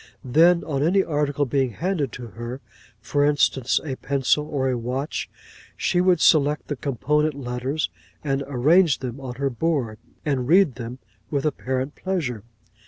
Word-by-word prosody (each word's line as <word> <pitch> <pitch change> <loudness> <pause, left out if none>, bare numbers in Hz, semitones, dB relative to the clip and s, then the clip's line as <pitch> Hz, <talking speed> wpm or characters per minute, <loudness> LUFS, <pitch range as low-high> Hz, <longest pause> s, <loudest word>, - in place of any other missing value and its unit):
'Then, 165 +7 +4
on 140 -3 -2
any 185 +6 +3
article 145 -2 0
being 130 -2 0
handed 165 - -1
to 120 +1 -8
her, 120 +4 -7 0.4
for 145 +5 0
instance, 145 -3 +2
a 140 - -3
pencil, 140 +2 +1
or 135 -3 -1
a 130 - +1
watch, 125 +5 -3 0.5
she 180 - +1
would 180 -2 +3
select 150 -1 +3
the 145 - -1
component 145 +4 0
letters, 130 - -3 0.3
and 140 -2 -1
arrange 150 +5 +4
them 130 0 -6
on 125 -2 -6
her 140 +1 -1
board, 125 -5 -1 0.3
and 135 -4 0
read 180 -2 +5
them 120 +1 -7 0.3
with 140 -1 -1
apparent 130 -2 -2
pleasure. 145 - -3
140 Hz, 155 wpm, -23 LUFS, 125-155 Hz, 0.5 s, read